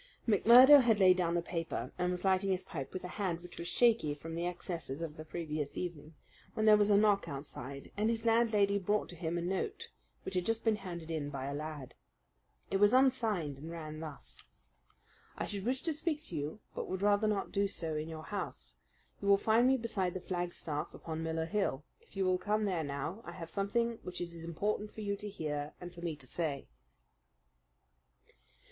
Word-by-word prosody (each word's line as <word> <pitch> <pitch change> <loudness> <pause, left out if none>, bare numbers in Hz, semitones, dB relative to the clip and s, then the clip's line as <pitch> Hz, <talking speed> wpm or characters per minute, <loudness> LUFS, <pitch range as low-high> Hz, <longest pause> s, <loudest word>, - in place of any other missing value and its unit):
McMurdo 250 +7 +9
had 225 -4 +3
laid 185 -1 +7
down 170 -2 +1
the 170 - +1
paper, 165 -1 -3
and 180 - +1
was 180 +1 -3
lighting 190 +1 +3
his 185 -1 0
pipe 150 -7 -6
with 185 - -5
a - - -4
hand 175 -4 -1
which 175 - -6
was 170 - -4
shaky 225 -12 +3
from 165 +2 -8
the 170 +1 -1
excesses 165 -5 -5
of 165 -2 -5
the 155 - -7
previous 155 -3 -4
evening, 165 -3 -5 0.4
when 215 - +1
there 215 -1 +8
was 210 0 +3
a 205 - +6
knock 205 -1 +3
outside, 140 -1 -7
and 215 +2 +1
his 230 0 -1
landlady 220 -3 +3
brought 205 +2 0
to 175 - -9
him 170 0 -2
a 170 - -2
note 185 +2 -3 0.3
which - - -4
had 180 -1 +1
just 225 +4 0
been 220 -2 +3
handed 170 -4 -7
in 150 -3 -2
by 135 -2 -4
a 140 - -3
lad. 150 -3 -6 0.8
It 195 - +3
was 205 +3 +5
unsigned, 220 - +2
and 155 +3 -8
ran 155 -2 -6
thus: 155 -3 -9 1.0
I - - -2
should 200 -1 -4
wish 255 +2 0
to 325 - 0
speak 310 0 -1
to 175 - -7
you, 150 +8 -4
but - - -4
would 190 +1 -3
rather 205 +1 +4
not 210 -2 -1
do 200 0 +2
so 165 -5 -3
in 155 +1 -3
your 160 -1 -7
house. 110 - -5 0.5
You 200 - -3
will 200 0 +7
find 225 +4 +4
me 265 0 +4
beside 195 -7 -2
the - - -2
flagstaff 175 -4 -3
upon 160 -1 -5
Miller 160 0 -1
Hill. 165 -6 -1 0.2
If - - -17
you 190 - +2
will 185 0 +2
come 210 +3 0
there 180 -5 0
now, 145 +8 -4
I - - -8
have 165 -2 -8
something 230 +4 0
which 180 -1 -6
it 170 -1 -4
is 165 -1 -6
important 205 +5 -2
for 220 - -8
you 200 -1 -1
to 210 0 -6
hear 150 -6 -4
and 175 0 -8
for 170 - -11
me 170 -3 -2
to 145 -3 -10
say. 145 0 -2
180 Hz, 210 wpm, -33 LUFS, 160-210 Hz, 1.0 s, McMurdo